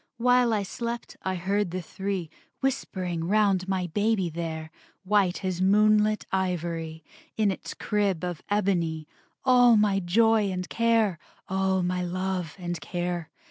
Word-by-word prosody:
While 245 Hz, 0 st, +4 dB
I 210 Hz, -2 st, +1 dB
slept 235 Hz, +4 st, -5 dB
I 190 Hz, 0 st, -2 dB
heard 195 Hz, +2 st, 0 dB
the 185 Hz, +2 st, -3 dB
three 190 Hz, -2 st, -4 dB, 0.3 s
Whispering 185 Hz, -11 st, -2 dB
round 195 Hz, -1 st, +2 dB
my 190 Hz, -1 st, 0 dB
baby 205 Hz, +1 st, 0 dB
there, 160 Hz, -1 st, -5 dB, 0.3 s
White 195 Hz, -1 st, +1 dB
as 185 Hz, -1 st, -1 dB
moonlit 215 Hz, +2 st, +4 dB
ivory, 170 Hz, -4 st, -2 dB, 0.3 s
In 215 Hz, -2 st, +3 dB
its 190 Hz, -, -7 dB
crib 200 Hz, -5 st, 0 dB
of 175 Hz, -3 st, -3 dB
ebony, 175 Hz, -6 st, 0 dB, 0.4 s
All 245 Hz, -3 st, +6 dB
my 205 Hz, -2 st, +3 dB
joy 215 Hz, +3 st, +3 dB
and 180 Hz, -1 st, -3 dB
care, 225 Hz, -6 st, +2 dB, 0.3 s
All 190 Hz, 0 st, +1 dB
my 180 Hz, 0 st, -1 dB
love 180 Hz, -2 st, -3 dB
and 175 Hz, -3 st, -4 dB
care. 175 Hz, -2 st, -3 dB
190 Hz, 140 wpm, -27 LUFS, 175-210 Hz, 0.4 s, All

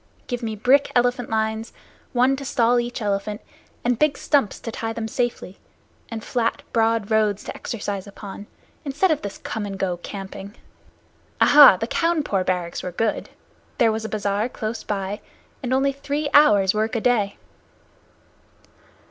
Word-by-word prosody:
Give 245 Hz, -1 st, -4 dB
me 220 Hz, -2 st, -3 dB
brick 260 Hz, +6 st, +3 dB
elephant 245 Hz, 0 st, +1 dB
lines, 220 Hz, 0 st, -1 dB, 0.4 s
one 255 Hz, +2 st, +3 dB
stall 245 Hz, -3 st, +1 dB
to 240 Hz, -, +2 dB
each 240 Hz, -1 st, -5 dB
elephant, 205 Hz, +1 st, -2 dB, 0.5 s
and 245 Hz, -1 st, +1 dB
big 300 Hz, -2 st, +2 dB
stumps 280 Hz, -9 st, +1 dB
to 230 Hz, -, -5 dB
tie 225 Hz, 0 st, -4 dB
them 225 Hz, -1 st, -4 dB
to 220 Hz, -, -7 dB
safely, 240 Hz, -6 st, -2 dB, 0.5 s
and 225 Hz, -1 st, -6 dB
flat, 235 Hz, -2 st, -1 dB
broad 225 Hz, -2 st, +1 dB
roads 215 Hz, -2 st, +2 dB
to -, -, -7 dB
exercise 205 Hz, -3 st, -4 dB
upon, 200 Hz, 0 st, -9 dB, 0.4 s
instead 295 Hz, +6 st, +1 dB
of 310 Hz, -, 0 dB
this 200 Hz, -, -6 dB
come 220 Hz, -, -5 dB
and 200 Hz, -1 st, -5 dB
go 185 Hz, -2 st, -1 dB
camping. 195 Hz, +2 st, -8 dB, 0.8 s
Aha, 290 Hz, -9 st, +8 dB
the 225 Hz, -, -2 dB
Cawnpore 305 Hz, -, 0 dB
barracks 180 Hz, -2 st, -2 dB
were 180 Hz, -, -5 dB
good. 215 Hz, +5 st, -1 dB, 0.5 s
There 230 Hz, -2 st, +4 dB
was 220 Hz, 0 st, -3 dB
a 220 Hz, -, -4 dB
bazaar 205 Hz, +2 st, -1 dB
close 220 Hz, -1 st, -5 dB
by, 200 Hz, 0 st, -3 dB, 0.4 s
and 250 Hz, -2 st, -4 dB
only 270 Hz, +1 st, +3 dB
three 285 Hz, +1 st, -3 dB
hours' 205 Hz, -10 st, +6 dB
work 220 Hz, +2 st, -1 dB
a 230 Hz, -, 0 dB
day." 215 Hz, -5 st, +1 dB
225 Hz, 160 wpm, -23 LUFS, 205-245 Hz, 0.8 s, Aha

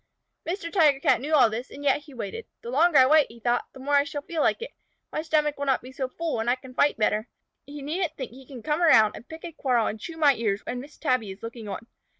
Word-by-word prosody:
Mr. 335 Hz, -1 st, -3 dB
Tiger 300 Hz, -7 st, +4 dB
Cat 260 Hz, -, +3 dB
knew 305 Hz, +3 st, +1 dB
all 255 Hz, -5 st, +7 dB
this, 230 Hz, +4 st, -5 dB
and 285 Hz, -, -10 dB
yet 280 Hz, 0 st, +3 dB
he 295 Hz, -, -14 dB
waited. 205 Hz, -5 st, -6 dB, 0.2 s
"The 235 Hz, -, -6 dB
longer 315 Hz, +3 st, +4 dB
I 260 Hz, -, +8 dB
wait," 300 Hz, +2 st, +5 dB
he 235 Hz, -, -14 dB
thought, 240 Hz, +1 st, 0 dB
"the -, -, -12 dB
more 285 Hz, +2 st, -3 dB
I 285 Hz, 0 st, +6 dB
shall 290 Hz, 0 st, -6 dB
feel 325 Hz, 0 st, -3 dB
like 465 Hz, -, +1 dB
it. -, -, -7 dB, 0.4 s
My -, -, -2 dB
stomach 300 Hz, -2 st, 0 dB
will 285 Hz, -, -2 dB
not 265 Hz, -3 st, +1 dB
be 255 Hz, -, -10 dB
so 260 Hz, -1 st, -3 dB
full 325 Hz, -3 st, -3 dB
and 225 Hz, +2 st, 0 dB
I 245 Hz, -, +3 dB
can 260 Hz, 0 st, -13 dB
fight 285 Hz, +3 st, +2 dB
better. 215 Hz, +1 st, +1 dB, 0.4 s
He 285 Hz, 0 st, -8 dB
needn't 330 Hz, +3 st, -2 dB
think 260 Hz, -5 st, -5 dB
he 260 Hz, +1 st, -14 dB
can 250 Hz, -5 st, -10 dB
come 305 Hz, +2 st, 0 dB
around 220 Hz, -11 st, +6 dB
and 235 Hz, -, -12 dB
pick 320 Hz, +2 st, -9 dB
a 340 Hz, -, -6 dB
quarrel 250 Hz, -7 st, +1 dB
and 220 Hz, -, -3 dB
chew 325 Hz, +9 st, -8 dB
my 295 Hz, -3 st, +5 dB
ears 215 Hz, -4 st, -2 dB
when 245 Hz, 0 st, -4 dB
Miss 290 Hz, +3 st, -13 dB
Tabby 255 Hz, -8 st, 0 dB
is 190 Hz, +3 st, -10 dB
looking 230 Hz, -1 st, -7 dB
on. 200 Hz, +3 st, -6 dB
270 Hz, 275 wpm, -26 LUFS, 235-305 Hz, 0.4 s, I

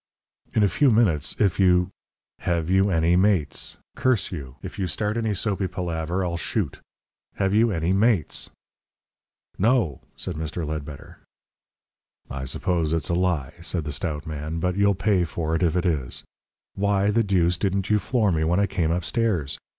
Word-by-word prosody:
"In 110 Hz, -, +4 dB
a -, -, +5 dB
few 140 Hz, +7 st, +3 dB
minutes, 100 Hz, -, +2 dB
if 100 Hz, -4 st, +1 dB
you 90 Hz, -1 st, +4 dB, 0.2 s
" -, -, -69 dB
"Have 85 Hz, 0 st, 0 dB
you 95 Hz, +1 st, +4 dB
any 85 Hz, -1 st, +3 dB
mates? 90 Hz, -6 st, +1 dB, 0.2 s
Curse 125 Hz, -6 st, +1 dB
you. 70 Hz, -8 st, -7 dB
If 95 Hz, +2 st, -7 dB
you 95 Hz, -, 0 dB
start 105 Hz, +4 st, -1 dB
any 110 Hz, -3 st, 0 dB
soapy 100 Hz, -1 st, -1 dB
palaver 90 Hz, 0 st, -2 dB
I'll 85 Hz, -1 st, -2 dB
shoot. -, -, -2 dB, 0.6 s
Have 95 Hz, 0 st, 0 dB
you 115 Hz, +2 st, +4 dB
any 85 Hz, -2 st, 0 dB
mates?" 100 Hz, -, +1 dB, 1.1 s
"No," 105 Hz, -, +2 dB
said 90 Hz, -4 st, -5 dB
Mr. 80 Hz, +1 st, -3 dB
Ledbetter. 75 Hz, -2 st, -7 dB, 1.1 s
"I 65 Hz, 0 st, -4 dB
suppose 80 Hz, +4 st, 0 dB
it's 80 Hz, -3 st, -1 dB
a -, -, +1 dB
lie," 85 Hz, -7 st, 0 dB
said 85 Hz, -1 st, -3 dB
the 75 Hz, -1 st, -4 dB
stout 75 Hz, 0 st, -3 dB
man. 80 Hz, +1 st, -4 dB
"But 90 Hz, +2 st, 0 dB
you'll 100 Hz, 0 st, +3 dB
pay 95 Hz, -1 st, +2 dB
for 80 Hz, -1 st, -3 dB
it 80 Hz, -, -1 dB
if 85 Hz, -2 st, +2 dB
it 90 Hz, -, +1 dB
is. 75 Hz, -8 st, -1 dB, 0.5 s
Why 100 Hz, 0 st, +1 dB
the 115 Hz, +2 st, +3 dB
deuce 90 Hz, -4 st, +2 dB
didn't 95 Hz, +1 st, -1 dB
you 105 Hz, -, +4 dB
floor 110 Hz, 0 st, +1 dB
me 80 Hz, -2 st, +1 dB
when 85 Hz, +4 st, +2 dB
I 100 Hz, -, +4 dB
came 90 Hz, -5 st, -1 dB
upstairs? 90 Hz, -, 0 dB
90 Hz, 175 wpm, -24 LUFS, 80-100 Hz, 1.1 s, a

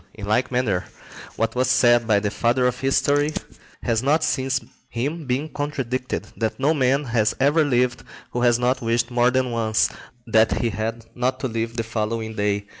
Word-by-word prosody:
In 105 Hz, -, -7 dB
like 110 Hz, +6 st, +1 dB
manner, 115 Hz, -8 st, 0 dB, 0.5 s
what 115 Hz, 0 st, -1 dB
was 130 Hz, 0 st, +1 dB
said 120 Hz, -2 st, +4 dB
by 105 Hz, -2 st, +4 dB
the 105 Hz, 0 st, -2 dB
father 120 Hz, +3 st, +1 dB
of 125 Hz, -1 st, 0 dB
history(71) 145 Hz, +2 st, +2 dB, 0.5 s
has 115 Hz, -2 st, +1 dB
not 150 Hz, +4 st, +2 dB
since 130 Hz, -1 st, 0 dB, 0.3 s
him 145 Hz, +6 st, -3 dB
been 130 Hz, +5 st, -1 dB
contradicted, 135 Hz, -4 st, -3 dB
that 110 Hz, -1 st, -2 dB
no 145 Hz, +4 st, +3 dB
man 135 Hz, 0 st, +2 dB
has 115 Hz, -4 st, +1 dB
ever 145 Hz, +4 st, +4 dB
lived 125 Hz, -3 st, +1 dB, 0.3 s
who 120 Hz, -, -2 dB
has 120 Hz, -1 st, +4 dB
not 125 Hz, +2 st, 0 dB
wished 115 Hz, +1 st, 0 dB
more 120 Hz, 0 st, +3 dB
than 130 Hz, -1 st, 0 dB
once 110 Hz, -2 st, +1 dB, 0.4 s
that 110 Hz, -1 st, +3 dB
he 115 Hz, -, 0 dB
had 110 Hz, +3 st, -4 dB
not 130 Hz, +1 st, -1 dB
to -, -, 0 dB
live 115 Hz, 0 st, -3 dB
the 115 Hz, -, 0 dB
following 110 Hz, 0 st, -3 dB
day. 105 Hz, -1 st, 0 dB
120 Hz, 185 wpm, -23 LUFS, 115-130 Hz, 0.5 s, said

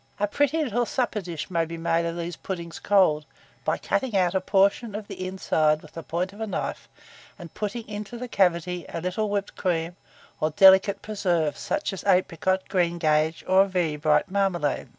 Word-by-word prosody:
A 205 Hz, -, +2 dB
pretty 290 Hz, +8 st, +1 dB
little 240 Hz, -3 st, 0 dB
supper 240 Hz, -5 st, -1 dB
dish 170 Hz, -1 st, -6 dB
may 170 Hz, -2 st, +2 dB
be 165 Hz, +1 st, -6 dB
made 165 Hz, 0 st, 0 dB
of 170 Hz, 0 st, -4 dB
these 170 Hz, 0 st, -4 dB
puddings 170 Hz, -3 st, -6 dB
cold, 185 Hz, -7 st, +3 dB, 0.4 s
by -, -, 0 dB
cutting 255 Hz, -7 st, -1 dB
out 180 Hz, -1 st, +2 dB
a 190 Hz, -, +1 dB
portion 200 Hz, +3 st, +2 dB
of 210 Hz, -1 st, -6 dB
the 185 Hz, -, -5 dB
inside 155 Hz, -5 st, +1 dB
with 155 Hz, -, -14 dB
the 165 Hz, -, -6 dB
point 180 Hz, +4 st, -3 dB
of 210 Hz, -, -11 dB
a 220 Hz, -, -2 dB
knife, 200 Hz, -, -4 dB, 0.5 s
and 170 Hz, -5 st, -11 dB
putting 215 Hz, +2 st, -4 dB
into 210 Hz, +2 st, -6 dB
the 250 Hz, +1 st, -5 dB
cavity 180 Hz, -4 st, +1 dB
a 170 Hz, -, -4 dB
little 185 Hz, +5 st, -2 dB
whipped 200 Hz, -1 st, -2 dB
cream 170 Hz, -2 st, -1 dB, 0.4 s
or 155 Hz, -, +1 dB
delicate 190 Hz, +4 st, +6 dB
preserve, 175 Hz, -8 st, 0 dB
such 300 Hz, -8 st, -2 dB
as 190 Hz, -, -7 dB
apricot, 185 Hz, 0 st, +2 dB
greengage, 165 Hz, -3 st, +1 dB
or 190 Hz, +1 st, +5 dB
very 175 Hz, -5 st, 0 dB
bright 150 Hz, +4 st, +1 dB
marmalade. 180 Hz, -10 st, 0 dB
185 Hz, 185 wpm, -25 LUFS, 165-205 Hz, 0.5 s, delicate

